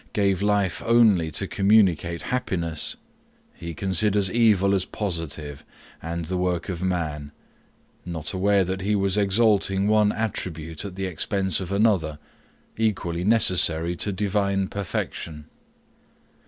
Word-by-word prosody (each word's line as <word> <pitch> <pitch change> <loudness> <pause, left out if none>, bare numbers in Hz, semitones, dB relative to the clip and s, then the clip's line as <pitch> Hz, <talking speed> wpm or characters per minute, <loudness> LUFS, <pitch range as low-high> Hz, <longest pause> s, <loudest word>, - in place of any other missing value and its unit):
gave 100 -2 +1
life 100 -3 0
only 110 -8 +4
to 75 - -2
communicate 95 -5 +2
happiness, 85 -10 -1 0.6
he 85 -1 -8
considers 95 +2 +1
evil 105 -4 +3
as 95 -2 +1
positive, 80 -9 -5 0.4
and 85 +1 -4
the 90 +3 -3
work 90 +1 -1
of 90 -2 -4
man; 80 -6 -2 0.7
not 80 -2 -5
aware 100 +1 +2
that 95 +1 -3
he 105 +2 0
was 100 -1 +1
exalting 100 -1 +2
one 105 -1 +3
attribute 80 -8 -4
at 100 -3 -7
the 95 0 -3
expense 95 +1 -1
of 95 -1 -6
another, 100 -8 +1 0.6
equally 95 -6 -1
necessary 90 -6 +3
to 100 - -2
divine 100 0 0
perfection. 85 -5 -5
95 Hz, 125 wpm, -24 LUFS, 85-100 Hz, 0.7 s, only